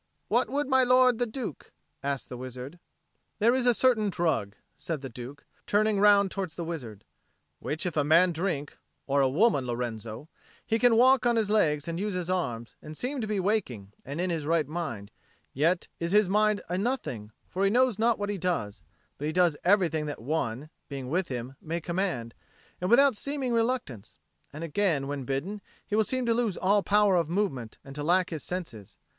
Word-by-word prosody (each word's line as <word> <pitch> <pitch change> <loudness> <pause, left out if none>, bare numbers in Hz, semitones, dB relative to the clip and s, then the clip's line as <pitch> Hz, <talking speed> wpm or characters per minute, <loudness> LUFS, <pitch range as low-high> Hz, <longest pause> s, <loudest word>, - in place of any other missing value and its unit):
"What - - +2
would 290 +1 -1
my 265 -1 +4
lord 250 -1 +4
the 245 - +1
Duke?" 220 - -6 0.3
asked 140 -1 -3
the 125 - -6
wizard. 130 +6 -8 0.6
"There 225 +3 +4
is 255 -1 +1
a 245 - +6
certain 225 -5 +3
drug," 145 - -1 0.2
said 160 -4 -4
the 135 - -6
Duke, 125 +5 -9 0.2
turning 210 0 +2
round 200 -1 +5
towards 185 -5 -4
the 170 - -4
wizard, 125 - -7 0.5
"which 155 +4 -4
if 180 - -2
a 150 - +2
man 165 +5 +5
drink 160 -4 -3 0.3
or 140 0 +2
a 135 - +3
woman, 145 - +2
Lorenzo 120 +1 -4 0.4
he 225 0 0
can 245 -1 +5
walk 255 +1 +5
on 240 - +3
his 215 -2 +1
legs 150 -9 +2
and 170 0 -3
use 205 -1 -2
his 180 0 -2
arms, 120 -11 -3
and 155 0 -9
seem 260 +1 -3
to 215 - -3
be 210 -2 -1
waking 155 - -1
and 140 +4 -6
in 180 0 0
his 155 -3 -3
right 160 -3 +2
mind; 145 -11 -5 0.4
yet 165 +6 +1
is 170 +2 -2
his 210 -2 +5
mind 210 +2 +2
a 180 +2 -1
nothing, 165 - -3 0.2
for 190 - -2
he 195 - +4
knows 245 -1 +2
not 230 0 +3
what 205 0 -3
he 200 - -4
does, 105 - -2 0.4
but 150 +2 -2
does 175 -4 +4
everything 170 -5 +2
that 145 - -5
one, 140 +1 -3 0.2
being 135 -2 -6
with 180 +2 0
him, 125 0 -5
may 165 +2 -3
command, 170 -10 -2 0.5
and 180 - -1
without 270 +1 +6
seeming 270 +1 -2
reluctance; 230 - -2 0.3
and 150 +3 -7
again, 165 -3 0
when 140 -2 -4
bidden, 155 +11 -3 0.2
he 210 - -2
will 220 - +4
seem 255 +4 -2
to 230 - +3
lose 225 -5 0
all 200 +2 +3
power 205 -1 +3
of 170 -3 +1
movement, 150 - -2
and 135 - -9
to 145 - -5
lack 180 +4 +2
his 160 -3 -4
senses. 145 - -6
175 Hz, 195 wpm, -28 LUFS, 140-210 Hz, 0.6 s, a